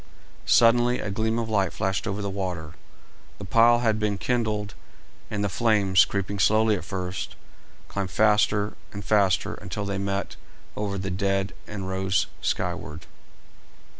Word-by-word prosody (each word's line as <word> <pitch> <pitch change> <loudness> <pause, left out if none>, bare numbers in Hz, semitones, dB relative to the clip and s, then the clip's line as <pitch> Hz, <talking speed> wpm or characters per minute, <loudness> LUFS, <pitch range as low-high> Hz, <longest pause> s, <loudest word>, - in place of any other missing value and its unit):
Suddenly 120 +1 +5
a 105 - -3
gleam 110 +3 0
of 115 -1 -1
light 100 -3 +1
flashed 95 +3 -2
over 100 0 -3
the - - -2
water; 90 -6 -4 0.6
the 100 - -8
pile 120 +5 +5
had 110 -2 +1
been 105 -2 0
kindled, 110 -5 -1 0.6
and 105 -1 -2
the - - +1
flames, 100 -3 +3
creeping 100 0 -3
slowly 110 +3 +4
at 95 - -5
first, 95 0 -5 0.5
climbed 100 -2 -3
faster 105 0 +2 0.2
and 100 0 -7
faster 100 0 +2
until 100 0 -5
they 100 -1 -2
met 100 0 -3 0.4
over 100 -1 -2
the 95 0 -3
dead 95 +1 0
and 100 -3 -5
rose 95 0 0 0.2
skyward. 80 +2 -3
100 Hz, 145 wpm, -25 LUFS, 95-110 Hz, 0.6 s, Suddenly